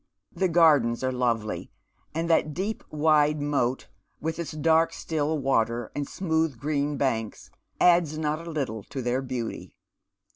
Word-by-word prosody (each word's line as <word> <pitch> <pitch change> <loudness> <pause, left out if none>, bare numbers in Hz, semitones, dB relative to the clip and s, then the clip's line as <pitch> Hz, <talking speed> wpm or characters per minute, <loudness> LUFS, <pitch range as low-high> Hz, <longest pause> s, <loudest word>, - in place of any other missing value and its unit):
The 190 - 0
gardens 150 -9 +4
are 130 - +1
lovely, 120 -4 -1 0.5
and 165 +1 -1
that 155 -3 +2
deep 200 +5 -3
wide 150 0 +3
moat, 140 -3 0 0.3
with 160 +1 -3
its 170 - -4
dark 160 +1 +2
still 155 -1 -1
water 120 -4 0
and 145 -1 -2
smooth 160 -6 -1
green 145 +2 -1
banks, 115 -6 -2 0.3
adds 170 -3 +4
not 155 +2 -2
a - - -4
little 135 -9 -3
to 130 - -6
their 125 +2 0
beauty. 125 -3 -5
150 Hz, 145 wpm, -26 LUFS, 130-160 Hz, 0.5 s, gardens